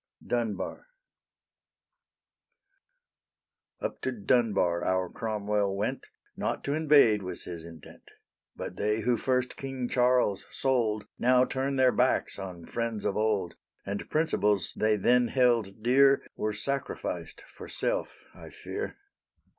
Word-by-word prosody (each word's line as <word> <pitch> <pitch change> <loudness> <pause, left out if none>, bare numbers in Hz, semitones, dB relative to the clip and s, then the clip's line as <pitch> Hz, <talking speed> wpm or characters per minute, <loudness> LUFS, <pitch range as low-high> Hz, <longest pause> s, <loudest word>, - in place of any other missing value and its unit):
DUNBAR 115 - -2 2.9
Up - - -4
to 130 - -1
Dunbar 100 -6 +1
our 95 -1 0
Cromwell 105 -2 -1
went, 105 - -2 0.3
Not - - -2
to 140 - -1
invade 145 -9 +5
was 90 -2 -6
his 85 -2 -7
intent; 80 -2 -13 0.5
But 90 - -6
they 105 +2 0
who 120 +2 +2
first 125 +2 0
King 135 -2 -4
Charles 125 -5 +2
sold 115 -6 0
Now 125 +1 +5
turn 135 +1 -2
their 130 -1 +5
backs 125 -4 +1
on 90 -3 -7
friends 115 -3 -3
of - - 0
old, 105 -5 0 0.3
And 100 +1 -4
principles 105 - +1
they 110 0 +2
then 120 +4 +3
held 115 -5 +1
dear 135 +3 +5
Were 105 0 -2
sacrificed 140 +6 -4
for - - -9
self, - - -3
I - - -12
fear. - - -6
115 Hz, 125 wpm, -29 LUFS, 100-130 Hz, 2.9 s, invade